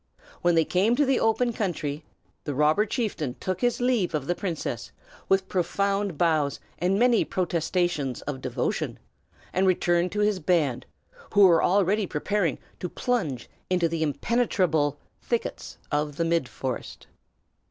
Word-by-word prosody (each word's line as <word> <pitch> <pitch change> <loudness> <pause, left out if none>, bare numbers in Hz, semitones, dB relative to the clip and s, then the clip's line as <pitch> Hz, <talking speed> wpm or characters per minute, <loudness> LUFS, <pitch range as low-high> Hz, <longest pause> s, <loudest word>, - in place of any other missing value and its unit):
When 175 -1 +3
they 165 -1 +4
came 200 +6 +2
to 290 +3 +3
the 265 -1 +2
open 235 +2 +2
country, 155 -8 -3 0.4
the 145 - -4
robber 155 +9 +3
chieftain 160 - -2
took 185 -1 -3
his 245 -1 +1
leave 240 -9 +1
of 145 -3 -2
the 175 - +1
princess, 160 - -4 0.4
with 190 0 +3
profound 200 0 0
bows 155 -4 +1 0.2
and 185 +3 +2
many 240 0 +4
protestations 175 -6 -1
of 140 -2 -5
devotion, 130 -2 -2 0.6
and 190 +1 +2
returned 175 -1 +2
to 210 - 0
his 210 -2 +2
band, 150 -7 +1 0.5
who 205 - +6
were 170 -3 +5
already 200 +2 +2
preparing 170 +1 0 0.2
to 180 - -4
plunge 170 - -2 0.2
into 180 -2 +2
the 165 0 -3
impenetrable 160 - +1 0.2
thickets 475 +1 -3
of 150 -1 -1
the 165 - 0
midforest. 135 -5 -3
175 Hz, 140 wpm, -26 LUFS, 150-205 Hz, 0.6 s, who